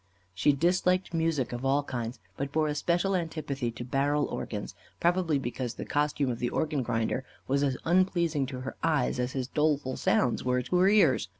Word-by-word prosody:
She 100 +10 +3
disliked 180 +4 +1
music 160 -7 0
of 120 +1 -5
all 140 +2 +2
kinds, 120 -2 -4 0.2
but 140 +4 -4
bore 155 +1 +1
a 150 - 0
special 175 +5 +1
antipathy 150 -7 -2
to 120 - -7
barrel 140 +3 +1
organs; 105 -2 -5 0.3
probably 175 -3 +2
because 125 -2 -4
the - - -6
costume 145 -2 0
of 120 - -5
the 120 - 0
organ 150 -3 -1
grinder 115 +2 -1 0.2
was 140 +1 +1
as 135 -3 +1
unpleasing 170 -5 +2
to 130 -1 -6
her 130 - -6
eyes, 155 -5 +1
as 125 +1 -1
his 130 -2 -2
doleful 150 -2 0
sounds 125 - +1
were 125 0 +1
to 180 - -2
her 185 +2 +5
ears. 165 - +4
140 Hz, 190 wpm, -29 LUFS, 125-165 Hz, 0.3 s, her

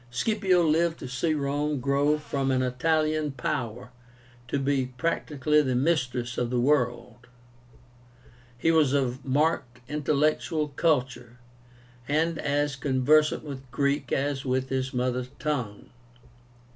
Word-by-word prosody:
Scipio 185 - +2
lived 165 +1 +2
to - - -7
see 130 +6 -1
Rome 145 0 -1
grow 140 +3 +2
from 140 -2 -2
an 130 -1 +2
Italian 155 +3 0
power 125 -1 -4 0.6
to 140 - -1
be 135 -1 0
practically 150 -2 +1
the 130 -3 -1
mistress 125 -4 0
of 120 - -1
the 125 0 0
world. 125 -2 0 1.3
He 165 +7 +2
was 155 -4 +3
of 130 -2 0
marked 135 -3 0
intellectual 150 +1 0
culture, 125 -5 -1 0.7
and 160 +3 0
as 145 0 0
conversant 140 +3 +2
with 135 -3 -8
Greek 140 +3 -1
as 140 0 -1
with 130 0 -1
his 130 0 -1
mother 125 0 -1
tongue. 125 -9 -3
140 Hz, 120 wpm, -27 LUFS, 125-150 Hz, 1.3 s, was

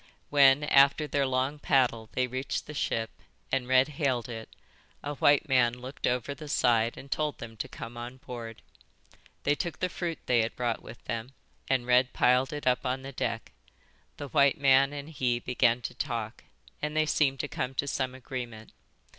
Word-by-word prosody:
When 140 0 +6
after 140 +1 +5
their 140 -1 0
long 130 +3 -1
paddle 120 -6 +2
they 130 - +1
reached 130 +2 -3
the 150 - -8
ship 115 -5 -1 0.4
and 130 -2 0
Red 130 +1 +5
hailed 135 -5 -1
it, 110 -1 -7 0.5
a 145 - -3
white 145 +2 +3
man 120 -3 +3
looked 130 +2 -5
over 125 +3 -1
the 150 +1 -10
side 115 -3 +2
and 140 - -11
told 150 -1 -1
them 115 -1 -9
to - - -4
come 115 +1 -8
on 120 +2 -7
board. 115 -3 -8 0.8
They 145 - +3
took 170 +2 -3
the 185 - -1
fruit 170 -3 -3
they 120 -2 +3
had 110 - -2
brought 120 -2 -1
with 120 - -12
them 115 +3 -4 0.4
and 130 -2 +1
Red 125 0 +3
piled 125 +3 +3
it 150 -1 -5
up 125 -1 +2
on 130 0 -2
the 135 - -7
deck. 120 - -3 0.7
The 145 - -6
white 140 +4 +4
man 135 0 +5
and 145 0 -6
he 130 -6 0
began 120 0 +1
to - - -4
talk, 115 -1 -4 0.4
and 150 +1 -2
they 155 - +4
seemed 135 -3 +1
to - - -4
come 135 -1 -4
to 140 - -1
some 130 -2 -2
agreement. 120 -4 -7
130 Hz, 190 wpm, -29 LUFS, 120-140 Hz, 0.8 s, When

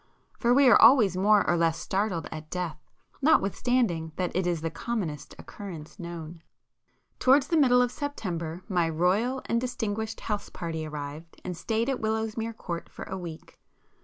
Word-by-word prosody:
For 235 - +2
we 275 +2 +6
are 240 - +7
always 225 -6 +7
more 205 +2 +4
or 175 - +3
less 165 -1 +2
startled 190 -5 -1
at 155 0 -8
death 170 -4 -3 0.4
notwithstanding 225 - +2
that 180 -1 -2
it 185 0 +1
is 170 -3 0
the 165 0 -2
commonest 165 - -4
occurrence 180 -3 -9
known. 170 -1 -7 0.8
Towards 270 +2 +4
the 335 - +2
middle 250 -5 +5
of 245 - -1
September 180 - -4
my 175 -5 +1
'royal 195 +11 +1
and 235 0 0
distinguished' 220 -3 -3
house 210 -2 -3
party 160 -2 -4
arrived 150 +2 -7
and 180 - -3
stayed 220 +7 -1
at 270 -2 -1
Willowsmere 220 +1 -2
Court 170 -1 -5
for - - -9
a 190 - -5
week. 170 -4 -9
190 Hz, 160 wpm, -27 LUFS, 165-230 Hz, 0.8 s, are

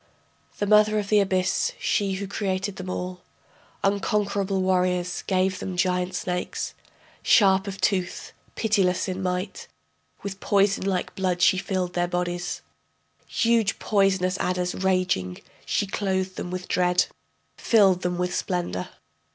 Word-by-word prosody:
The 205 - 0
mother 215 +1 +5
of 205 -1 -2
the 210 - +5
abyss, 185 -2 +1
she 200 -2 0
who 195 +1 -3
created 195 0 -2
them 185 0 -6
all, 180 0 -4 0.6
Unconquerable 200 -1 0
warriors, 180 -1 +1
gave 190 0 +1
them 185 -1 -5
giant 180 0 0
snakes, 180 0 -3 0.5
Sharp 195 -2 +4
of 195 0 -5
tooth, 185 -2 -1 0.2
pitiless 195 -5 +1
in 185 0 -3
might, 185 +1 -3 0.6
With 195 -1 -5
poison 195 -1 +2
like 185 -2 -1
blood 185 -2 -1
she 185 +1 +4
filled 185 -2 -2
their 175 0 +1
bodies, 175 0 -3 0.6
Huge 230 -3 +2
poisonous 195 -2 +1
adders 180 0 -1
raging, 185 - 0 0.3
she - - +1
clothed 190 -2 -2
them - - -5
with 185 0 -5
dread, 180 0 +2 0.5
Filled 195 -5 +4
them 180 -1 -1
with 180 0 -1
splendor.... 130 - -2
185 Hz, 135 wpm, -25 LUFS, 180-195 Hz, 0.6 s, mother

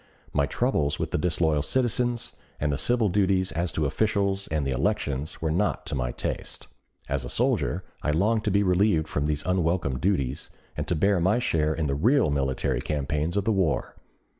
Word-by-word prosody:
My 70 -1 +2
troubles 75 - 0
with - - -3
the - - 0
disloyal 80 -2 +1
citizens 120 - 0 0.3
and 75 0 0
the 70 - -1
civil 120 - +2
duties 95 -1 +1
as 85 +1 -1
to 80 - 0
officials 100 +4 0
and 75 -3 -1
the 70 - -1
elections 75 - -2
were 80 - +1
not 95 +6 0
to - - -4
my 60 -3 -1
taste. - - -5 0.4
As 70 -1 -1
a - - -6
soldier - - 0 0.2
I - - -1
longed 105 +8 +2
to - - +2
be 100 +1 +3
relieved 90 -3 +2
from 75 -1 -1
these 75 -1 -2
unwelcome 85 -7 0
duties, 70 -8 -1 0.3
and - - -3
to 90 - +1
bear 100 +4 +2
my 95 +7 +3
share 80 -9 +1
in 80 - -1
the 70 - 0
real 110 - +3
military 65 -2 0
campaigns 75 +5 -1
of 100 - 0
the 115 - +2
war. 95 -7 0
80 Hz, 190 wpm, -26 LUFS, 75-100 Hz, 0.4 s, be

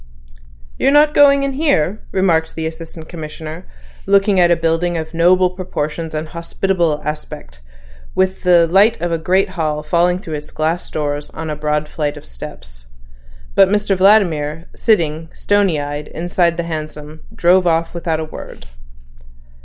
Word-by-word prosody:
"You're - - +3
not 295 +1 +5
going 280 -1 +5
in 275 - -1
here," 240 - 0
remarked 170 -4 +1
the 160 - -3
Assistant 160 0 -7
Commissioner, 160 +1 -8 0.4
looking 195 0 +3
at 175 -1 +5
a 170 - +5
building 165 +1 0
of 160 0 -6
noble 180 +2 +4
proportions 160 -3 -4
and 155 +1 -4
hospitable 170 -1 -1
aspect, 150 - -6 0.6
with 190 0 0
the 175 -2 +5
light 200 +7 +3
of 175 0 -2
a 165 - 0
great 185 +4 +1
hall 155 -4 -2
falling 175 +3 +2
through 165 -4 -8
its 150 0 -6
glass 160 +3 -2
doors 145 -1 -3
on 160 -1 -5
a - - -3
broad 150 0 -1
flight 150 -1 -3
of - - -12
steps. - - -11 0.7
But 190 - +5
Mr 205 -1 +1
Vladimir, 170 -6 +2
sitting, 165 -6 +1
stony 200 -6 +1
eyed, 145 +1 -5
inside 175 0 0
the 170 - -1
hansom, 155 -1 -6
drove 180 +1 +3
off 165 0 +1
without 165 -2 -2
a 160 - -3
word. 155 - -10
165 Hz, 155 wpm, -18 LUFS, 155-185 Hz, 0.7 s, not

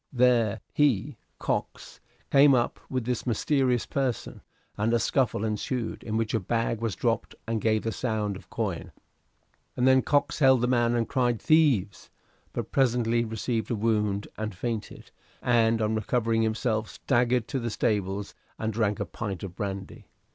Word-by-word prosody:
There 120 -5 +3
he 140 -10 +1 0.2
(Cox) - - -4 0.3
came 140 0 +7
up 120 -1 0
with 130 -3 -2
this 125 0 -2
mysterious 125 +1 +1
person, 130 -4 -2 0.3
and 105 +2 0
a - - +5
scuffle 115 -2 +1
ensued 110 +2 -3
in 110 -1 -3
which 115 -1 -1
a 115 - +2
bag 115 +3 -1
was 115 -3 -1
dropped 115 -1 -1
and 115 -2 -2
gave 110 -1 +1
the 115 - -1
sound 110 -4 -2
of - - -12
coin; - - -3 0.9
and 125 - +3
then 130 0 +6
Cox 145 +1 +1
held 130 -4 +5
the 125 - +2
man 120 -1 +2
and 115 -2 0
cried 120 -4 +1
'Thieves!' 140 - +2 0.4
but - - -5
presently 120 -3 +2
received 110 0 -2
a 120 - 0
wound 105 -2 0
and 110 -2 -3
fainted, 115 +2 -5 0.3
and 115 -2 +3
on 110 +1 +1
recovering 115 +1 +1
himself, 110 0 0
staggered 125 -1 +1
to 135 - -1
the 115 -1 -2
stables 100 -2 -1 0.2
and 110 0 -2
drank 105 -2 0
a - - -1
pint 100 -6 -5
of 90 -3 -7
brandy. 100 -2 -5
115 Hz, 160 wpm, -27 LUFS, 110-125 Hz, 0.9 s, came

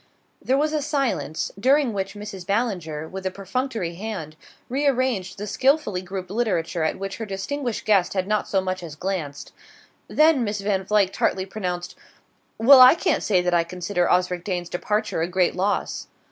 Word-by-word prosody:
There 265 - +1
was 305 +2 +1
a 305 - 0
silence, 265 - -1
during 265 +1 +3
which 195 0 -3
Mrs. 205 -3 -7
Ballinger, 180 -8 -1
with 190 +3 -7
a - - +1
perfunctory 200 0 -3
hand, 180 -5 -6 0.3
rearranged 255 -8 0
the 205 - -5
skilfully 260 -4 +1
grouped 185 0 -6
literature 195 -7 -1
at 160 - 0
which 195 0 -5
her 225 - -4
distinguished 240 +5 -3
guest 200 -3 +3
had 185 0 0
not 210 0 0
so 195 - +1
much 185 0 -3
as 160 -4 -8
glanced; 160 -5 -4 0.6
then 305 -4 +4
Miss 205 -1 -2
Van 195 -2 0
Vluyck 200 -2 +2
tartly 190 0 0
pronounced: 180 -3 -4 0.6
"Well, 255 +4 +8
I 255 +4 +9
can't 345 - 0
say 185 -4 +2
that 180 0 0
I 170 -1 +4
consider 180 +1 -1
Osric 180 -1 +1
Dane's 180 -3 -3
departure 210 0 -1
a 165 - 0
great 180 0 +1
loss." 195 +3 -1
195 Hz, 175 wpm, -23 LUFS, 180-235 Hz, 0.6 s, I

